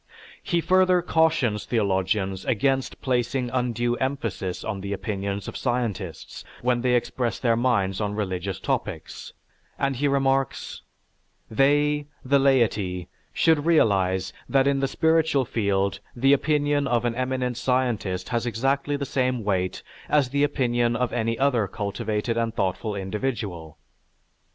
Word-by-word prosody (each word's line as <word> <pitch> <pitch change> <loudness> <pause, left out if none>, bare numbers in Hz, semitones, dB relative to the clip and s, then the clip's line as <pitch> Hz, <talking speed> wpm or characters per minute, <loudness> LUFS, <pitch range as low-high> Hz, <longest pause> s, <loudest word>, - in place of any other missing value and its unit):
He 170 -1 0
further 185 +1 +3
cautions 160 -11 +2
theologians 95 -3 0
against 135 +1 0
placing 125 -1 0
undue 120 -1 0
emphasis 115 -9 -3
on 100 -3 -4
the 100 +1 -3
opinions 100 0 -3
of - - -6
scientists 115 - -3 0.2
when 125 -1 +2
they 125 0 +2
express 120 -1 -1
their 115 -3 +2
minds 110 -5 +1
on 105 -1 -2
religious 95 -2 -3
topics, - - -4 0.4
and 135 -2 0
he 145 +3 +1
remarks: 135 -1 0 0.7
"They 145 +4 +2 0.2
(the 140 +2 +4
laity) 110 -10 +1 0.2
should 160 -2 +2
realize 95 - +2 0.2
that 135 -1 +3
in 140 0 +2
the 135 - +1
spiritual 160 -1 +2
field 100 -4 0 0.2
the 135 +3 +4
opinion 145 -1 +1
of 120 -2 +1
an 120 - +1
eminent 125 -1 -2
scientist 120 -8 -1
has 120 0 -1
exactly 135 +5 0
the 140 0 -3
same 130 -3 0
weight 95 -3 -1 0.3
as 145 -4 +3
the 140 +2 +1
opinion 120 -5 +1
of 125 -1 -1
any 115 -1 0
other 125 -6 +2
cultivated 110 +2 -2
and 115 -1 -1
thoughtful 100 +3 -1
individual." 100 - -4
120 Hz, 135 wpm, -25 LUFS, 100-135 Hz, 0.7 s, the